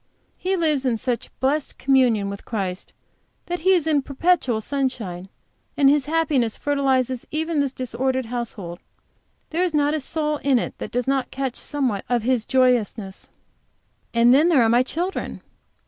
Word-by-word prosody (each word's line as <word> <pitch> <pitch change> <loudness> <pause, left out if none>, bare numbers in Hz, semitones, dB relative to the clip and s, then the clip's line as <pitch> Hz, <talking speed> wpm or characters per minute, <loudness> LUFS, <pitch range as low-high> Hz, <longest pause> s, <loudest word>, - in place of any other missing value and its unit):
He 380 +1 -1
lives 305 -5 +1
in 250 -4 +1
such 245 0 -3
blessed 280 +3 0
communion 250 -7 +3
with 200 0 -6
Christ 195 -5 -4 0.5
that 350 0 -3
he 375 +4 +4
is 345 -4 +2
in 305 -3 +2
perpetual 275 -4 +1
sunshine, 220 -8 -3 0.5
and 275 -1 +6
his 290 -2 +1
happiness 295 -8 +1
fertilizes 265 -3 0
even 315 0 -1
this 280 -2 +1
disordered 260 +1 -2
household; 225 -7 -5 0.7
there 335 +3 +1
is 350 -4 0
not 290 0 +2
a 310 - 0
soul 300 +1 -1
in 275 -3 +2
it - - -3
that - - -5
does 245 +1 -2
not 270 -1 0
catch 265 -2 -3
somewhat 255 -9 -1
of 240 -2 +1
his 245 -2 0
joyousness. 240 -6 +1 0.8
And 235 +1 +5
there 295 -2 +5
are 225 - +3
my 240 +2 +5
children! 345 +8 -3
265 Hz, 160 wpm, -23 LUFS, 235-295 Hz, 0.8 s, and